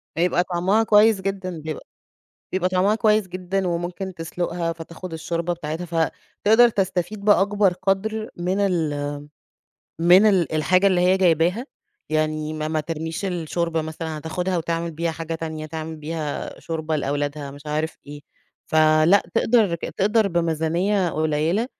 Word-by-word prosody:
بيبقى 175 +1 +2
طعمها 185 +5 +1
كويس 215 -1 +5
جدًا، 190 -3 -4
بيبقى 155 -1 -6 0.7
بيبقى 185 -1 +1
طعمها 185 +3 +2
كويس 215 -3 +2
جدًا، 185 +1 -2
وممكن 175 +2 -3
تسُلُقها 170 0 -3
فتاخُد 165 +2 -9
الشوربة 170 +2 -2
بتاعتها 165 0 -5 0.6
فتقدر 225 +3 +7
تستفيد 195 -1 -2
بأكبر 205 -1 +4
قدر 200 +4 -1
من 180 +3 -1
ال 155 -7 0 0.9
من 180 +5 +6
ال 190 -6 +2
الحاجة 180 +5 +3
اللي 185 -2 +3
هي 180 +1 +4
جايباها 180 - +2 0.4
يعني 155 0 -1
ما 155 0 -3
ما 155 0 0
ترميش 160 +3 -4
الشوربة 170 -2 -1
مثلًا 160 0 -5
هتاخدها 180 +4 -2
وتعمل 165 0 -2
بيها 165 +1 -2
حاجة 165 0 -5
تانية، 160 -1 -5
تعمل 160 0 -6
بيها 155 -1 -5
شوربة 160 -1 -3
لأولادها 145 0 -2
مش 145 +1 -12
عارف 155 +2 -2
إيه 145 0 -9 0.5
فلا 155 +4 +4
تقدر 220 -7 +3 0.2
تقدر 210 +1 +3
بميزانية 170 +3 0
قليلة 155 +8 0
170 Hz, 135 wpm, -23 LUFS, 160-190 Hz, 0.9 s, فتقدر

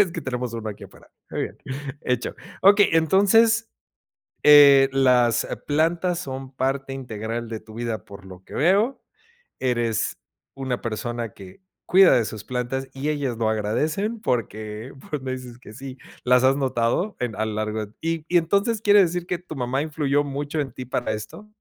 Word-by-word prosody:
Es 175 - +3
que 165 - -4
tenemos 125 -3 -3
uno 115 -2 -5
aquí 105 - -8
afuera, - - -17 0.2
muy - - -3
bien, - - -5 0.5
hecho. 125 -1 -1 0.3
Okey. 200 +1 +6
Entonces, 205 +8 +4 0.7
eh, 140 -2 +8
las 125 -3 +3 0.2
plantas 165 +4 +1
son 135 -4 -6
parte 135 +1 -2
integral 115 -2 -5
de 110 -1 -5
tu 110 0 -14
vida, 115 -2 -3
por 100 -1 -13
lo 95 -1 -12
que - - -14
veo, 205 - +2 0.6
eres 120 -3 0 0.4
una 130 -2 -3
persona 115 0 -4
que 95 - -13 0.3
cuida 190 0 +7
de 115 - +2
sus 110 -1 -6
plantas, 130 +2 -3
y 140 +3 -3
ellas 140 -6 -2
lo 110 -2 0
agradecen, 155 - -1
porque, 110 - -3 0.2
pues, 150 -3 -3
me 130 -1 -4
dices 125 -2 -8
que 105 - -13
sí, 130 +1 -9 0.3
las 125 0 +4
has 130 +1 +5
notado 130 - 0
en 120 -3 -3
a 110 - -1
lo 110 - -3
largo 110 0 -2
de 105 - -23
Y 165 -1 -2
y 175 - +3
entonces, 200 +6 +1
¿quiere 205 -1 +6
decir 180 -1 0
que 180 - -1
tu 175 -3 -9
mamá 130 +1 -1
influyó 145 -2 0
mucho 145 +2 -4
en 135 -4 -4
ti 125 +1 -8
para 120 -2 -2
esto? 110 - -8
130 Hz, 180 wpm, -23 LUFS, 115-160 Hz, 0.7 s, eh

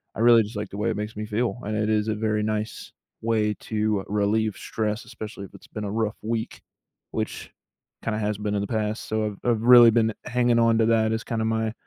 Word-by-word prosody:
I - - -7
really 120 -1 +7
just 105 +2 -9
like 105 -1 -4
the 100 - -7
way 105 +3 0
it 115 - -2
makes 105 +1 -4
me 105 +1 -4
feel, 115 +3 -1
and 105 +1 -3
it 105 0 0
is 105 0 +1
a 110 - 0
very 105 0 0
nice 110 0 -3 0.3
way 110 -2 +1
to 105 -2 -1
relieve 105 +1 +1
stress 110 0 -3
especially 110 -3 -8
if - - -16
it's - - -15
been 105 -1 -6
a 100 - -3
rough 110 -1 -1
week, 110 0 -3 0.5
which - - -4 0.5
kinda 110 -1 -1
has 105 -1 -1
been 105 0 -2
in - - +1
the 100 - -3
past, 110 0 -2
so, 110 0 0
I've 105 -2 -4
I've 115 -3 +2
really 120 -1 +9
been 110 -1 +2
hanging 120 -1 +2
on 115 -1 +4
to 110 - +4
that 110 -1 +3
as 110 - -2
kinda 110 -1 -2
my 110 0 0
110 Hz, 235 wpm, -25 LUFS, 105-115 Hz, 0.5 s, really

